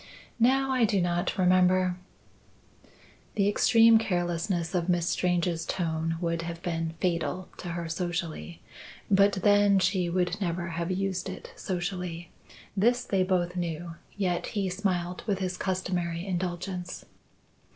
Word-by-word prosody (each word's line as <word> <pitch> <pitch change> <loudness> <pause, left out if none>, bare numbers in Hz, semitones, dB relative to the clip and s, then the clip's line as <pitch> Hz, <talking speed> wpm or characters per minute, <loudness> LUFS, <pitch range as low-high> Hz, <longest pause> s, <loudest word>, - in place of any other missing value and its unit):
"No, 265 +3 +3
I 255 -2 +2
do 205 -3 +3
not 175 0 0
remember." 185 0 +4 1.4
The 200 -1 +2
extreme 225 +2 +6
carelessness 175 -2 -1
of 180 -1 0
Miss 175 -1 +2
Strange's 175 -2 0
tone 165 -1 -1
would 170 -1 -1
have 170 0 -5
been 165 -2 -2
fatal 180 +1 -1
to 175 - -5
her 170 -1 -4
socially; 170 0 -4 0.5
but 200 +1 +5
then, 205 +1 +4
she 185 -2 +1
would 180 +2 0
never 170 -1 -2
have 170 +1 -3
used 190 0 -1
it 185 - -9
socially. 175 -2 -4 0.4
This 240 +5 +3
they 195 -5 0
both 180 -1 +1
knew, 170 -1 -3 0.2
yet 180 -3 0
he 195 -2 +1
smiled 180 -2 -2
with 200 -3 +1
his 185 -1 -2
customary 180 -2 -2
indulgence. 180 0 -4
180 Hz, 130 wpm, -28 LUFS, 170-195 Hz, 1.4 s, extreme